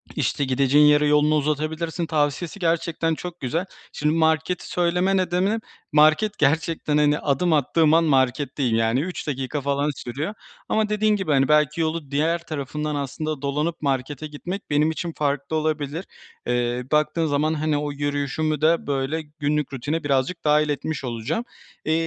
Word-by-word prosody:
işte, 145 - 0
gideceğin 135 +3 +4
yere 150 0 +5
yolunu 150 +1 +4
uzatabilirsin 155 +3 -1
tavsiyesi 155 +4 -1
gerçekten 165 -1 0
çok 175 +1 -7
güzel. 160 +9 -2 0.3
Şimdi 150 +1 0
marketi 160 +2 +1
söyleme 180 +2 +1
nedenim 185 +4 +1 0.3
market, 155 +8 +4
gerçekten, 155 +1 +1
hani, 150 0 +3
adım 155 +4 +1
attığım 155 +2 +3
an 165 +1 +5
marketteyim. 135 -3 +1
Yani, 115 +3 +2
3 180 +1 -5
dakika 135 +1 -2
falan 140 +2 0
sürüyor 140 - -4 0.4
ama 215 -1 +1
dediğin 210 0 +2
gibi, 190 -6 -2
hani, 135 -1 +3
belki 150 +1 +3
yolu 160 -3 -2
diğer 165 +4 0
tarafından 150 0 -3
aslında 145 +1 -3
dolanıp 150 +4 -2
markete 140 +1 -2
gitmek 175 +7 -7
benim 150 +2 +2
için 170 +1 -4
farklı 140 +1 -1
olabilir. 155 +2 -2 0.4
Eee, 120 0 0
baktığın 155 +2 +2
zaman, 150 +1 +1
hani, 155 -1 0
o 145 0 -2
yürüyüşümü 145 +1 -1
de, 165 +1 +2
böyle, 140 +3 -1 0.2
günlük 150 -1 -1
rutine 145 +5 -2
birazcık 140 +5 0
dâhil 150 0 +3
etmiş 145 0 -3
olacağım. 125 - -2 0.4
Eee, 155 - +1
150 Hz, 150 wpm, -23 LUFS, 140-165 Hz, 0.4 s, yere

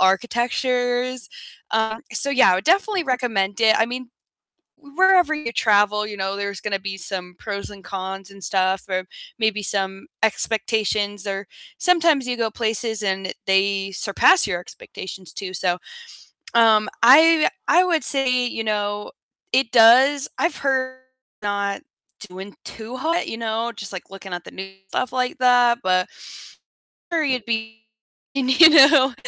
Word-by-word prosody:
architectures. 245 +4 0 0.4
Uh, 220 0 0 0.2
so 280 - -1
yeah, 255 -9 +5
I - - +2
would 190 - -4
definitely 395 +1 +2
recommend 230 -6 -1
it. 220 -1 +5
I 225 - +2
mean, 250 +1 -6 0.7
wherever 335 +2 +2
you 270 -6 -5
travel, 210 -1 +2
you 210 -1 -8
know, 195 +1 -3
there's 200 -1 -5
gonna 200 -2 -2
be 195 0 -6
some 180 0 -4
pros 200 -2 -6
and 200 -1 -14
cons 195 0 -6
and 195 -1 -15
stuff 190 0 0
or 185 0 -2 0.3
maybe 220 -2 0
some 195 -1 -1 0.2
expectations, 210 -2 0
or, 195 0 -4 0.3
sometimes 330 -7 +2
you 245 - -2
go 230 -2 -1
places 220 -1 -2
and 190 -1 -2
they 195 0 +1
surpass 200 - +3
your 180 -4 -2
expectations 185 -1 -10
too. 190 -2 -7
So, 175 -1 -1 0.8
um, 220 -2 +4
I 300 +8 +7
w 310 - +2 0.2
I 360 +2 +5
would 335 -3 0
say, 255 -3 +1
you 225 -2 -4
know, 205 -1 -3 0.4
it 255 -3 +2
does 255 +5 +5
I've 340 - -1
heard 260 -1 -1 0.4
not 200 +2 -2 0.5
doing 190 +2 -10
too 230 +3 -8
hot, 330 +6 -1
you 225 - -5
know, 230 +1 -3
just 200 -3 -4
like 190 - -8
looking 195 -1 -10
at 175 - -6
the - - -11
news 195 0 -8
and 195 0 -29
stuff 255 +4 -3
like 250 -1 -2
that, 245 -1 +4
but 185 0 +1 1.0
I'm 340 - -1
sure 315 - +1
you'd 255 -5 -1
be, 220 -1 -4 0.5
y 275 - -1 0.2
you 325 -1 +11
know 275 -4 +6
220 Hz, 160 wpm, -21 LUFS, 195-255 Hz, 1.0 s, you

